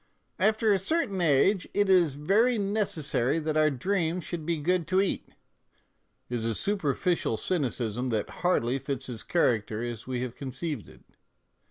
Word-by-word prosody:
" -, -, -42 dB
After 220 Hz, -1 st, +2 dB
a 195 Hz, -, +2 dB
certain 200 Hz, -, 0 dB
age 170 Hz, +5 st, +3 dB
it 205 Hz, 0 st, +3 dB
is 175 Hz, -7 st, +4 dB
very 215 Hz, -, +3 dB
necessary 170 Hz, -, 0 dB
that 155 Hz, -1 st, -2 dB
our 155 Hz, 0 st, +4 dB
dreams 170 Hz, +4 st, -1 dB
should 165 Hz, -3 st, -5 dB
be 170 Hz, -1 st, +1 dB
good 170 Hz, +2 st, 0 dB
to 185 Hz, +2 st, +2 dB
eat," 195 Hz, -, -1 dB, 1.0 s
is 120 Hz, -2 st, -3 dB
a 115 Hz, -1 st, -1 dB
super 195 Hz, -, 0 dB
ficial 175 Hz, -, 0 dB
cynicism 125 Hz, -, -1 dB
that 110 Hz, -3 st, -1 dB
hardly 135 Hz, -8 st, +1 dB
fits 135 Hz, 0 st, -4 dB
his 120 Hz, -4 st, -6 dB
character 110 Hz, -8 st, 0 dB
as 120 Hz, -1 st, -5 dB
we 125 Hz, -1 st, -2 dB
have 125 Hz, -1 st, -5 dB
conceived 135 Hz, -, -5 dB
it. -, -, -17 dB
155 Hz, 165 wpm, -28 LUFS, 125-190 Hz, 1.0 s, is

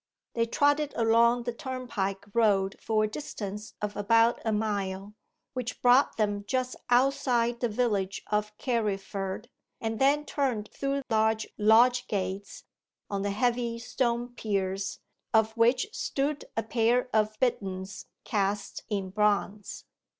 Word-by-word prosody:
They 230 Hz, 0 st, +1 dB
trotted 290 Hz, +3 st, +2 dB
along 235 Hz, +1 st, +4 dB
the 240 Hz, 0 st, -3 dB
turnpike 230 Hz, -7 st, -4 dB
road 200 Hz, -4 st, +3 dB
for 215 Hz, -1 st, +1 dB
a -, -, +2 dB
distance 210 Hz, -4 st, -6 dB
of 210 Hz, -1 st, -2 dB
about 230 Hz, +3 st, +3 dB
a 225 Hz, -, 0 dB
mile, 205 Hz, -2 st, -2 dB, 0.4 s
which 250 Hz, -2 st, -4 dB
brought 250 Hz, +3 st, +5 dB
them 205 Hz, -2 st, 0 dB
just 255 Hz, +1 st, -1 dB
outside 245 Hz, -2 st, +2 dB
the 240 Hz, -, 0 dB
village 210 Hz, -4 st, -1 dB
of 210 Hz, 0 st, -1 dB
Carriford, 200 Hz, -3 st, -2 dB, 0.3 s
and 225 Hz, -1 st, -3 dB
then 285 Hz, +2 st, +3 dB
turned 250 Hz, -9 st, -1 dB
through 275 Hz, 0 st, -2 dB
large 220 Hz, 0 st, +2 dB
lodge 235 Hz, +4 st, +5 dB
gates, 195 Hz, 0 st, -4 dB, 0.5 s
on 200 Hz, -1 st, -1 dB
the 200 Hz, -, -1 dB
heavy 235 Hz, +2 st, 0 dB
stone 240 Hz, 0 st, -1 dB
piers 195 Hz, -4 st, -2 dB, 0.4 s
of 220 Hz, 0 st, +4 dB
which 240 Hz, -, +3 dB
stood 285 Hz, +2 st, -2 dB
a 225 Hz, -, +1 dB
pair 235 Hz, +3 st, +2 dB
of 215 Hz, 0 st, +1 dB
bitterns 195 Hz, -6 st, -2 dB, 0.2 s
cast 200 Hz, -1 st, -1 dB
in 195 Hz, -3 st, -2 dB
bronze. 205 Hz, 0 st, 0 dB
220 Hz, 130 wpm, -28 LUFS, 205-245 Hz, 0.5 s, brought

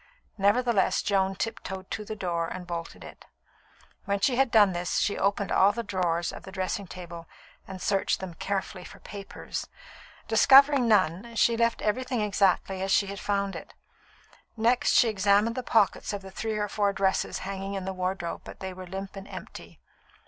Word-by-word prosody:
Nevertheless, 205 Hz, +1 st, +2 dB
Joan 195 Hz, -1 st, +1 dB
tiptoed 190 Hz, -3 st, -5 dB
to 215 Hz, -, -3 dB
the 215 Hz, +1 st, -6 dB
door 170 Hz, -4 st, -2 dB
and 180 Hz, +1 st, -7 dB
bolted 170 Hz, -1 st, -6 dB
it. -, -, -12 dB, 0.8 s
When 200 Hz, 0 st, 0 dB
she 245 Hz, +5 st, +2 dB
had 265 Hz, 0 st, +3 dB
done 210 Hz, -4 st, +5 dB
this, 175 Hz, 0 st, -2 dB
she 205 Hz, -, +1 dB
opened 200 Hz, 0 st, 0 dB
all 195 Hz, +2 st, +5 dB
the 235 Hz, -, -3 dB
drawers 175 Hz, -4 st, -1 dB
of -, -, -8 dB
the 190 Hz, -, -11 dB
dressing 190 Hz, +1 st, -3 dB
table 170 Hz, -2 st, -9 dB, 0.4 s
and 190 Hz, -1 st, -8 dB
searched 195 Hz, +1 st, 0 dB
them 190 Hz, -2 st, -6 dB
carefully 190 Hz, +1 st, -4 dB
for -, -, -12 dB
papers. 200 Hz, -1 st, -7 dB, 0.6 s
Discovering 275 Hz, -2 st, +6 dB
none, 205 Hz, +2 st, +2 dB
she 230 Hz, +1 st, +3 dB
left 230 Hz, 0 st, +1 dB
everything 250 Hz, +3 st, -1 dB
exactly 195 Hz, -2 st, +1 dB
as 195 Hz, 0 st, -1 dB
she 200 Hz, -, +4 dB
had 200 Hz, 0 st, -6 dB
found 200 Hz, -1 st, -1 dB
it. -, -, -10 dB, 0.8 s
Next 235 Hz, +3 st, +2 dB
she 240 Hz, -, +5 dB
examined 205 Hz, +2 st, +2 dB
the 255 Hz, -, -2 dB
pockets 220 Hz, -4 st, +1 dB
of 200 Hz, -1 st, -5 dB
the 190 Hz, -, -10 dB
three 220 Hz, +2 st, -3 dB
or 210 Hz, 0 st, -1 dB
four 200 Hz, 0 st, 0 dB
dresses 195 Hz, -1 st, 0 dB
hanging 195 Hz, 0 st, -4 dB
in 190 Hz, -1 st, -4 dB
the 190 Hz, -, -3 dB
wardrobe, 185 Hz, -1 st, -3 dB
but -, -, -11 dB
they 190 Hz, -1 st, -5 dB
were 185 Hz, 0 st, -9 dB
limp 195 Hz, +2 st, -6 dB
and 195 Hz, 0 st, -9 dB
empty. -, -, -10 dB
195 Hz, 180 wpm, -27 LUFS, 190-215 Hz, 0.8 s, Discovering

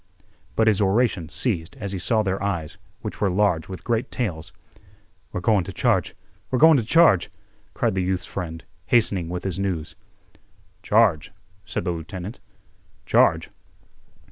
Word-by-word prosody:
But 110 Hz, -, +3 dB
his 110 Hz, -2 st, +3 dB
oration 100 Hz, -4 st, +1 dB
ceased 85 Hz, -, -2 dB
as 100 Hz, -2 st, -4 dB
he 95 Hz, -, -3 dB
saw 110 Hz, +4 st, +1 dB
their 95 Hz, -1 st, -2 dB
eyes, 90 Hz, -6 st, -3 dB, 0.2 s
which -, -, -7 dB
were 100 Hz, -, +3 dB
large 90 Hz, -4 st, +1 dB
with 95 Hz, -, -7 dB
great 115 Hz, -1 st, -1 dB
tales. 90 Hz, -11 st, -4 dB, 0.8 s
"We're 90 Hz, -, -4 dB
goin' 105 Hz, -2 st, +3 dB
t' -, -, -7 dB
charge—we're 100 Hz, +5 st, -2 dB
goin' 160 Hz, +3 st, +7 dB
t' 120 Hz, -, 0 dB
charge!" 120 Hz, -, +4 dB, 0.5 s
cried -, -, +1 dB
the 95 Hz, -, 0 dB
youth's 90 Hz, 0 st, -1 dB
friend, 80 Hz, -4 st, -6 dB, 0.2 s
hastening 100 Hz, -8 st, +2 dB
with 90 Hz, 0 st, -4 dB
his 95 Hz, -1 st, -3 dB
news. 90 Hz, -5 st, -3 dB, 0.9 s
"Charge?" 105 Hz, -7 st, +2 dB, 0.3 s
said -, -, -4 dB
the 90 Hz, -, 0 dB
lieutenant. 90 Hz, +5 st, -7 dB, 0.7 s
"Charge? -, -, +3 dB
95 Hz, 145 wpm, -23 LUFS, 90-110 Hz, 0.9 s, goin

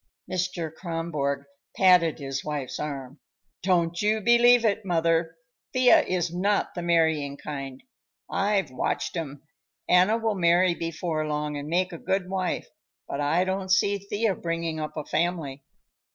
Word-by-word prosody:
Mr. 180 Hz, -3 st, -2 dB
Kronborg 160 Hz, -5 st, -3 dB, 0.3 s
patted 180 Hz, -4 st, +5 dB
his 135 Hz, -2 st, -4 dB
wife's 145 Hz, -4 st, -4 dB
arm. 140 Hz, -2 st, -5 dB, 0.4 s
"Don't 170 Hz, -2 st, +1 dB
you 215 Hz, +1 st, +2 dB
believe 240 Hz, +2 st, +5 dB
it, 215 Hz, 0 st, +1 dB
mother. 165 Hz, -2 st, +1 dB, 0.4 s
Thea 255 Hz, -2 st, +6 dB
is 175 Hz, -2 st, -2 dB
not 200 Hz, +3 st, 0 dB
the 175 Hz, -, -4 dB
marrying 160 Hz, -4 st, +1 dB
kind. 135 Hz, -3 st, -7 dB, 0.4 s
I've 195 Hz, -7 st, 0 dB
watched 130 Hz, -, -2 dB
'em. 145 Hz, -4 st, -5 dB, 0.4 s
Anna 185 Hz, +5 st, +4 dB
will 225 Hz, -1 st, 0 dB
marry 180 Hz, -1 st, +3 dB
before 165 Hz, -2 st, -3 dB
long 150 Hz, 0 st, -2 dB
and 145 Hz, +1 st, -5 dB
make 180 Hz, +2 st, 0 dB
a 170 Hz, -, -7 dB
good 190 Hz, 0 st, -1 dB
wife, 185 Hz, -1 st, -2 dB, 0.4 s
but 140 Hz, -, -3 dB
I 160 Hz, +5 st, +2 dB
don't 190 Hz, 0 st, -3 dB
see 200 Hz, +2 st, +3 dB
Thea 205 Hz, +2 st, -1 dB
bringing 165 Hz, -2 st, -3 dB
up 155 Hz, 0 st, -5 dB
a 150 Hz, -, -4 dB
family. 155 Hz, -5 st, -2 dB
170 Hz, 145 wpm, -26 LUFS, 150-190 Hz, 0.4 s, Thea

